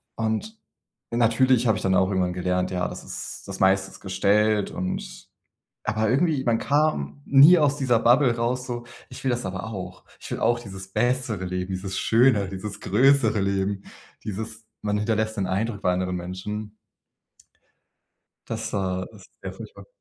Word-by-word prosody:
Und 115 - -2 0.5
natürlich 120 +1 +3
habe 110 - +3
ich - - -5
dann 95 -1 +2
auch 95 0 +3
irgendwann 90 -2 0
gelernt, 90 0 -1
ja, 90 -1 -1
das - - -8
ist - - -6
das - - -6
meiste 95 0 +3
ist - - -14
gestellt 100 +2 +2
und 90 0 -5 0.6
aber 110 0 0
irgendwie, 145 0 +2
man 115 -2 +2
kam 145 - 0
nie 145 +6 +8
aus 145 -1 +2
dieser 130 -5 +2
Bubble 120 +1 +4
raus, 125 +2 -1
so: 120 -1 -4 0.3
„Ich - - -10
will 130 - +1
das 120 -2 -2
aber 95 0 -5
auch. 95 -4 -7
Ich - - -9
will - - -2
auch 120 0 +2
dieses 95 -4 -9
bessere 120 -3 0
Leben, 90 +1 -3
dieses 95 +1 -4
Schönere, 115 -4 +3
dieses 100 +2 -6
größere 120 0 +3
Leben.“ 100 0 -1 0.4
Dieses: 110 +2 -6 0.2
Man 105 0 0
hinterlässt 110 +1 -1
den 95 -2 -1
Eindruck 100 +3 -2
bei 90 - +3
anderen 90 0 -1
Menschen. 105 +4 -6 1.7
Das, 110 0 -4
äh, 95 -2 -1
ist 100 -3 -16
sehr - - -5
furchtbar. 470 - -11
105 Hz, 165 wpm, -25 LUFS, 95-120 Hz, 1.7 s, nie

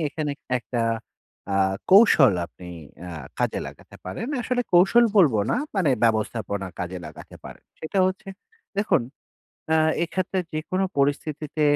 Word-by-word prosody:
এখানে 150 -1 -3 0.3
একটা 120 +1 -4 0.7
আ - - +1 0.4
কৌশল 185 - +7
আপনি 90 +2 -14 0.3
অ্যা 90 0 -8 0.3
কাজে - - 0
লাগাতে - - -12
পারেন। 95 - -5
আসলে 245 +1 -1
কৌশল 195 +7 +6
বলবো 150 - +5
না - - +1 0.2
মানে 180 -7 +2
ব্যবস্থাপনা 110 -3 -1
কাজে 90 +1 -4
লাগাতে - - -12
পারেন। - - -11 0.2
সেটা 160 +5 -3
হচ্ছে, 190 +1 -4 0.5
দেখুন 200 - +2 0.7
অ্যা 160 - +4 0.3
এক্ষেত্রে 185 +2 -2
যেকোনো 185 +5 -1
পরিস্থিতিতে 150 +2 -1
155 Hz, 130 wpm, -24 LUFS, 110-190 Hz, 0.7 s, কৌশল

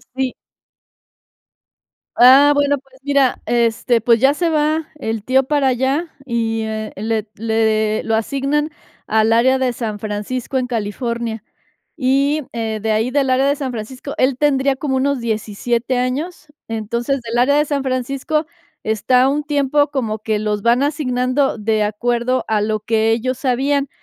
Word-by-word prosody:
Sí. 260 -1 -1 1.8
Ah, 270 +4 +7
bueno, 285 0 +2
pues, 265 0 -23
mira, 280 -3 +2
este, 235 0 +1
pues, 230 +1 +3
ya 270 +4 +4
se 335 +2 0
va 310 0 0
el 225 -7 -4
tío 265 +3 +3
para 285 0 +1
allá 265 +6 0 0.2
y, 225 -2 -1
eh, 220 0 -4
le 220 +1 -2
le 220 -1 0
lo 225 - 0
asignan 275 +6 -1 0.4
al 220 +1 +2
área 255 +3 +4
de 260 -1 0
San 220 -3 -4
Francisco, 215 +5 -3
en 255 -1 -1
California. 230 0 -3 0.5
Y, 280 +2 +1
eh, 225 -2 -3
de 220 - 0
ahí 220 +4 0
del 275 -1 +1
área 260 +1 +3
de 285 - +2
San 270 -3 -4
Francisco, 250 +5 -7
él 260 0 +2
tendría 275 -2 +2
como 270 -2 -2
unos 275 +1 +1
17 235 +2 -2
años. 290 +7 -3 0.2
Entonces, 235 +5 -2
del 235 0 -4
área 270 +4 +3
de 300 - +3
San 280 -2 -2
Francisco, 270 +4 -1 0.4
está 250 +4 +2
un 295 +2 -1
tiempo 290 0 +1
como 225 -6 -2
que 215 0 -1
los 210 -1 -2
van 240 +3 +3
asignando 270 -2 0
de 215 0 +1
acuerdo 240 +4 -1
a 215 -1 +1
lo 215 0 -1
que 220 +1 +1
ellos 255 +3 -1
sabían. 275 +2 0
250 Hz, 155 wpm, -19 LUFS, 225-275 Hz, 1.8 s, Ah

